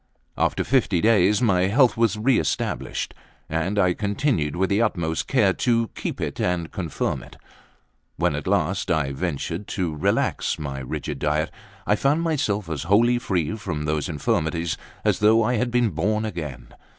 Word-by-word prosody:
After -, -, +1 dB
fifty 120 Hz, -9 st, +2 dB
days 105 Hz, +1 st, +4 dB
my 95 Hz, -5 st, +3 dB
health 120 Hz, +5 st, +4 dB
was 115 Hz, -3 st, +2 dB
re 120 Hz, +3 st, +3 dB
established, -, -, -2 dB, 0.3 s
and 80 Hz, +6 st, -1 dB
I 90 Hz, -3 st, +4 dB
continued 100 Hz, -, 0 dB
with 95 Hz, +2 st, 0 dB
the 100 Hz, +3 st, +3 dB
utmost 85 Hz, -7 st, -1 dB
care 105 Hz, -8 st, +3 dB
to 115 Hz, 0 st, +1 dB
keep -, -, -5 dB
it -, -, -4 dB
and 85 Hz, -3 st, -1 dB
confirm 85 Hz, -5 st, -2 dB
it. -, -, -14 dB, 0.8 s
When -, -, +1 dB
at -, -, -4 dB
last -, -, 0 dB
I 70 Hz, -3 st, +1 dB
ventured 85 Hz, +5 st, -3 dB
to 90 Hz, -5 st, -1 dB
relax 75 Hz, -, 0 dB
my 70 Hz, -3 st, -5 dB
rigid 65 Hz, -, -5 dB
diet, 75 Hz, +2 st, 0 dB, 0.3 s
I 105 Hz, -, +3 dB
found 145 Hz, +8 st, +1 dB
myself 110 Hz, -, 0 dB
as 80 Hz, -4 st, -3 dB
wholly 120 Hz, +4 st, +4 dB
free 95 Hz, -4 st, -1 dB
from 85 Hz, -8 st, -4 dB
those 75 Hz, 0 st, -1 dB
infirmities 80 Hz, +2 st, -1 dB, 0.3 s
as -, -, +2 dB
though 110 Hz, +2 st, +5 dB
I 125 Hz, +2 st, +1 dB
had 125 Hz, +3 st, 0 dB
been 120 Hz, -2 st, +2 dB
born 105 Hz, +7 st, 0 dB
again. 75 Hz, -, -6 dB
95 Hz, 165 wpm, -24 LUFS, 80-115 Hz, 0.8 s, though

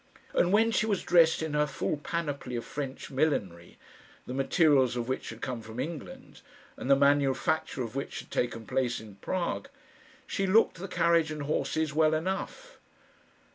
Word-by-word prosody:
And 180 Hz, -, +3 dB
when 225 Hz, +3 st, +4 dB
she 220 Hz, -, +1 dB
was 200 Hz, -4 st, 0 dB
dressed 165 Hz, -2 st, +4 dB
in 160 Hz, -2 st, -3 dB
her 150 Hz, 0 st, +2 dB
full 150 Hz, -, -2 dB
panoply 145 Hz, -5 st, -4 dB
of 120 Hz, -, -4 dB
French 140 Hz, -2 st, -6 dB
millinery 100 Hz, -, -1 dB, 0.5 s
the 125 Hz, -, -6 dB
materials 135 Hz, -2 st, +3 dB
of 120 Hz, -1 st, -2 dB
which 130 Hz, -, -3 dB
had 115 Hz, 0 st, -9 dB
come 125 Hz, -3 st, -3 dB
from 110 Hz, +2 st, -9 dB
England, 160 Hz, +2 st, -7 dB, 0.3 s
and -, -, -6 dB
the 140 Hz, -, +7 dB
manufacture 140 Hz, 0 st, +2 dB
of 115 Hz, +2 st, -7 dB
which 135 Hz, -, -4 dB
had -, -, -19 dB
taken 115 Hz, -2 st, -2 dB
place 130 Hz, -1 st, 0 dB
in 105 Hz, -3 st, -12 dB
Prague 175 Hz, -, -3 dB, 0.6 s
she 195 Hz, -, -1 dB
looked 210 Hz, 0 st, +4 dB
the 190 Hz, +3 st, -6 dB
carriage 170 Hz, -3 st, +2 dB
and 150 Hz, -1 st, -4 dB
horses 155 Hz, +1 st, -1 dB
well 155 Hz, 0 st, +3 dB
enough. 190 Hz, -, -4 dB
145 Hz, 170 wpm, -29 LUFS, 130-170 Hz, 0.6 s, the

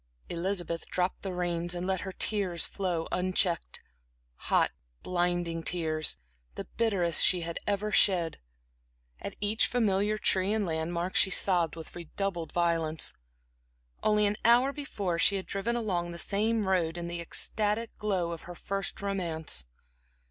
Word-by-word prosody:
Elizabeth 175 Hz, -1 st, -2 dB
dropped 180 Hz, 0 st, -1 dB
the 195 Hz, -, -4 dB
reins 175 Hz, -1 st, 0 dB
and 175 Hz, +1 st, -3 dB
let 190 Hz, -1 st, 0 dB
her 190 Hz, -, -5 dB
tears 185 Hz, -3 st, +1 dB
flow 180 Hz, -4 st, -2 dB
unchecked 180 Hz, -1 st, 0 dB, 0.7 s
hot, -, -, +4 dB, 0.3 s
blinding 175 Hz, -2 st, 0 dB
tears, 160 Hz, -, +1 dB, 0.4 s
the -, -, -4 dB
bitterest 195 Hz, -8 st, +2 dB
she 180 Hz, -2 st, +4 dB
had 170 Hz, 0 st, -3 dB
ever 205 Hz, +1 st, 0 dB
shed. 175 Hz, -5 st, +3 dB, 0.8 s
At -, -, -6 dB
each 210 Hz, +2 st, +1 dB
familiar 210 Hz, -3 st, +1 dB
tree 195 Hz, -1 st, +2 dB
and 215 Hz, -2 st, +1 dB
landmark 170 Hz, +2 st, -2 dB
she -, -, +5 dB
sobbed 180 Hz, -3 st, +3 dB
with 160 Hz, -1 st, -10 dB
redoubled 175 Hz, 0 st, -4 dB
violence. 165 Hz, -3 st, +1 dB, 0.9 s
Only 210 Hz, 0 st, +3 dB
an 205 Hz, +1 st, +1 dB
hour 245 Hz, +4 st, +5 dB
before 200 Hz, -, -3 dB
she 200 Hz, -, +4 dB
had 190 Hz, -, -3 dB
driven 205 Hz, +4 st, -2 dB
along 185 Hz, -7 st, -1 dB
this 170 Hz, 0 st, -1 dB
same 215 Hz, +1 st, +1 dB
road 175 Hz, -3 st, +1 dB
in 170 Hz, -, -4 dB
the 170 Hz, 0 st, -4 dB
ecstatic 210 Hz, +6 st, -2 dB
glow 190 Hz, -5 st, 0 dB
of 165 Hz, -, -6 dB
her 175 Hz, -, -7 dB
first 195 Hz, +2 st, -3 dB
romance. 165 Hz, -, 0 dB
180 Hz, 145 wpm, -30 LUFS, 170-200 Hz, 0.9 s, she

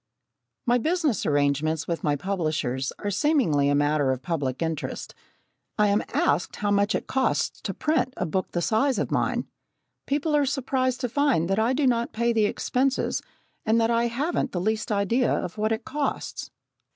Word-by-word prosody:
My 245 Hz, 0 st, +3 dB
business 315 Hz, -, 0 dB
arrangements 145 Hz, +2 st, +1 dB
with 170 Hz, -1 st, -3 dB
my 145 Hz, -1 st, +2 dB
publishers 155 Hz, -7 st, -2 dB
are 205 Hz, -, -3 dB
seemingly 195 Hz, -, +2 dB
a 145 Hz, -, +3 dB
matter 145 Hz, -1 st, +2 dB
of 130 Hz, 0 st, -3 dB
public 145 Hz, -4 st, -2 dB
interest. 160 Hz, -2 st, -4 dB, 0.6 s
I 210 Hz, -1 st, +4 dB
am 205 Hz, +1 st, +3 dB
asked 150 Hz, +5 st, +1 dB
how 205 Hz, -1 st, -1 dB
much 205 Hz, +1 st, +2 dB
it -, -, -2 dB
costs 265 Hz, 0 st, 0 dB
to -, -, -3 dB
print 305 Hz, -4 st, 0 dB
a -, -, -1 dB
book 185 Hz, +3 st, -2 dB
the 175 Hz, -, -1 dB
size 230 Hz, -, +2 dB
of -, -, -2 dB
mine. -, -, 0 dB, 0.6 s
People 295 Hz, +2 st, +1 dB
are 290 Hz, -2 st, +3 dB
surprised 260 Hz, -2 st, 0 dB
to 250 Hz, -, 0 dB
find 260 Hz, -, +2 dB
that 195 Hz, -, +2 dB
I 230 Hz, +4 st, +2 dB
do 280 Hz, +1 st, +1 dB
not 235 Hz, -2 st, +1 dB
pay 235 Hz, +1 st, +1 dB
the 220 Hz, -2 st, +3 dB
expenses 260 Hz, +5 st, 0 dB, 0.4 s
and 225 Hz, +1 st, +3 dB
that 225 Hz, 0 st, +2 dB
I 235 Hz, 0 st, +2 dB
haven't 275 Hz, +3 st, -1 dB
the 180 Hz, -, -1 dB
least 215 Hz, +4 st, -1 dB
idea 215 Hz, +5 st, +2 dB
of 180 Hz, +4 st, -2 dB
what 215 Hz, +1 st, +1 dB
it 225 Hz, -, -2 dB
costs. 290 Hz, 0 st, -3 dB
220 Hz, 180 wpm, -25 LUFS, 165-260 Hz, 0.6 s, I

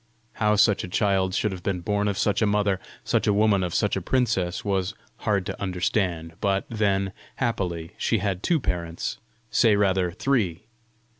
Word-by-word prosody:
How 105 Hz, 0 st, +4 dB
such 105 Hz, -1 st, +4 dB
a -, -, -4 dB
child 95 Hz, -1 st, +1 dB
should 105 Hz, -, +1 dB
have 95 Hz, -2 st, -6 dB
been 90 Hz, -1 st, -2 dB
born 105 Hz, +3 st, 0 dB
of 100 Hz, -2 st, -1 dB
such 105 Hz, -, +1 dB
a 110 Hz, -, +4 dB
mother 100 Hz, -2 st, +1 dB, 0.2 s
such -, -, +1 dB
a 105 Hz, -, +4 dB
woman 105 Hz, -2 st, +3 dB
of 90 Hz, -2 st, -3 dB
such 105 Hz, -, +2 dB
a 95 Hz, -, -2 dB
princess, 105 Hz, -6 st, 0 dB
was 95 Hz, 0 st, 0 dB, 0.2 s
hard 100 Hz, -4 st, 0 dB
to -, -, -5 dB
understand; 90 Hz, -3 st, -1 dB
but 100 Hz, 0 st, +1 dB
then, 100 Hz, -3 st, +1 dB, 0.2 s
happily, 90 Hz, -9 st, -2 dB
she 115 Hz, -, +2 dB
had 95 Hz, -2 st, -2 dB
two 165 Hz, +5 st, +2 dB
parents 85 Hz, -7 st, -3 dB, 0.3 s
say 110 Hz, -2 st, +4 dB
rather, 95 Hz, -3 st, +2 dB
three! 95 Hz, -4 st, 0 dB
100 Hz, 175 wpm, -25 LUFS, 90-105 Hz, 0.3 s, How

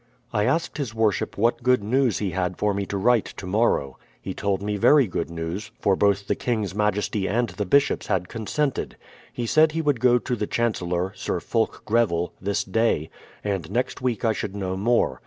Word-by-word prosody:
I 105 Hz, -1 st, +2 dB
asked 155 Hz, +5 st, 0 dB
his 120 Hz, -6 st, -3 dB
Worship 110 Hz, -6 st, 0 dB
what 115 Hz, +5 st, +2 dB
good 125 Hz, -2 st, +3 dB
news 125 Hz, +1 st, +2 dB
he 100 Hz, -3 st, -2 dB
had 90 Hz, 0 st, -2 dB
for 105 Hz, -1 st, +1 dB
me 100 Hz, 0 st, -2 dB
to 100 Hz, -, -3 dB
write 115 Hz, +2 st, +3 dB
to 100 Hz, -, -7 dB
morrow. 90 Hz, -, +1 dB, 0.2 s
He -, -, -5 dB
told 100 Hz, -1 st, -1 dB
me 105 Hz, 0 st, -1 dB
very 140 Hz, +7 st, +5 dB
good 85 Hz, -5 st, -3 dB
news, 85 Hz, +5 st, -5 dB
for 100 Hz, -, +2 dB
both 100 Hz, 0 st, +2 dB
the -, -, +1 dB
King's 110 Hz, -6 st, -2 dB
majesty 105 Hz, -1 st, 0 dB
and 120 Hz, +2 st, 0 dB
the 95 Hz, +2 st, -4 dB
bishops 140 Hz, +7 st, +2 dB
had 90 Hz, -3 st, 0 dB
consented. 130 Hz, +7 st, -2 dB, 0.3 s
He 120 Hz, -, -4 dB
said 155 Hz, +6 st, +4 dB
he 165 Hz, -, 0 dB
would 145 Hz, -5 st, +1 dB
go 125 Hz, 0 st, +5 dB
to 125 Hz, +1 st, -2 dB
the 105 Hz, -2 st, -3 dB
Chan 120 Hz, -1 st, +1 dB
cellor, 90 Hz, +1 st, -2 dB
Sir 90 Hz, -, -2 dB
Fulk 110 Hz, +6 st, -1 dB
Greville, 105 Hz, -7 st, +1 dB
this 100 Hz, +1 st, 0 dB
day, 100 Hz, -6 st, 0 dB, 0.3 s
and 95 Hz, -6 st, -2 dB
next 125 Hz, +6 st, -2 dB
week 120 Hz, -4 st, -1 dB
I 110 Hz, -, +3 dB
should 100 Hz, -1 st, -4 dB
know 95 Hz, -2 st, -2 dB
more. 100 Hz, -, +1 dB
105 Hz, 205 wpm, -24 LUFS, 95-120 Hz, 0.3 s, very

